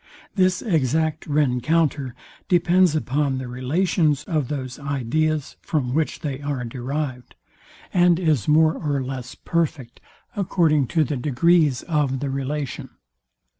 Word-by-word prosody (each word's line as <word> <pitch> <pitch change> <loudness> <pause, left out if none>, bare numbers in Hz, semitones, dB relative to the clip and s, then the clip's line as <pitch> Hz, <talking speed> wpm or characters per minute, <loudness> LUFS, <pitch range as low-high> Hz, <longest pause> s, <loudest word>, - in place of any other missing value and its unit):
This 185 -2 +2
exact 160 - 0
rencounter 145 -1 +1 0.3
depends 175 -1 +3
upon 140 -2 0
the 130 -1 -5
relations 150 +4 0
of 155 -5 -1
those 130 -2 -5
ideas, 145 +2 -1
from 130 -6 -1
which 155 +1 -1
they 140 -2 -4
are 145 -3 -3
derived, 130 +1 -4 0.6
and 175 -1 +4
is 155 - +1
more 155 +1 +5
or 145 -3 -2
less 130 -2 -6
perfect, 150 -8 -2 0.4
according 165 - +2
to 160 +4 +2
the 145 0 -2
degrees 145 +1 +2
of 145 -5 0
the 140 0 -3
relation. 140 +1 -4
150 Hz, 125 wpm, -23 LUFS, 130-160 Hz, 0.6 s, more